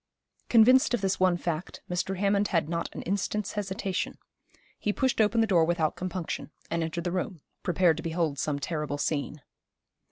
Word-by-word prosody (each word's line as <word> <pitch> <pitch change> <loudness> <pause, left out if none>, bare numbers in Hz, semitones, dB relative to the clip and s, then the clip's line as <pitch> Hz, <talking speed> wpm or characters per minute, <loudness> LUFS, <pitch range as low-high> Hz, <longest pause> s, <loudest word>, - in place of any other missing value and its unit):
Convinced 245 +2 +6
of 240 - -5
this 195 -1 0
one 185 -1 +4
fact, 170 0 -4
Mr. 180 +2 -2
Hammond 200 +1 +2
had 165 -4 +1
not 170 +1 -2
an - - -5
instant's 200 +2 -1
hesitation. 195 -2 -3 0.6
He 210 - 0
pushed 260 +1 +1
open 220 +2 +3
the - - +4
door 180 -6 +4
without 160 -2 +1
compunction, 180 -3 -4 0.2
and 170 - 0
entered 165 +1 -2
the 175 - -1
room, 180 -2 -3 0.2
prepared 175 -2 +3
to - - -5
behold 160 -4 -1
some 150 -2 0
terrible 150 -1 -3
scene. 145 0 -2
180 Hz, 170 wpm, -28 LUFS, 160-200 Hz, 0.6 s, Convinced